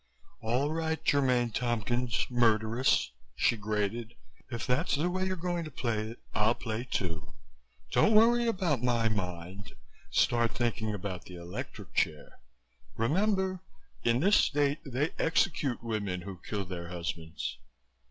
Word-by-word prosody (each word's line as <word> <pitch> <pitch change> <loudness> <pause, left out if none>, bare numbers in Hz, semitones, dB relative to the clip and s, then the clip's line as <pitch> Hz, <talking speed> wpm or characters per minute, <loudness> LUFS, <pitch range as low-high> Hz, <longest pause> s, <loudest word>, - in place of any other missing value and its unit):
"All 125 +6 +1
right, 160 0 -1
Germaine 125 -4 +3
Tompkins, 120 +1 0
murderess," 115 - +3 0.2
she 75 - +3
grated. 110 +1 -2 0.3
"If 115 - -4
that's 130 +7 +1
the 165 +5 0
way 185 +1 0
you're 185 - -1
going 175 -1 -2
to - - -6
play 115 -5 -2
it, 115 - -10
I'll 110 +2 +3
play 115 0 -4
too. 80 -5 -3 0.6
Don't 215 - +4
worry 235 +2 +6
about 180 - +1
my 120 -2 +2
mind. 95 -1 -4 0.3
Start 120 -2 +2
thinking 115 -2 -1
about 95 -3 -5
the 90 - -10
electric 85 0 -7
chair. 75 -2 -1 0.6
Remember, 190 - +1 0.4
in 120 +2 +3
this 200 +4 +5
state 145 0 +2
they 135 +3 -1
execute 150 -7 +1
women 100 -6 -2
who 95 -1 -8
kill 100 -2 -3
their 90 -2 -6
husbands." 85 -6 -4
120 Hz, 135 wpm, -30 LUFS, 105-145 Hz, 0.6 s, worry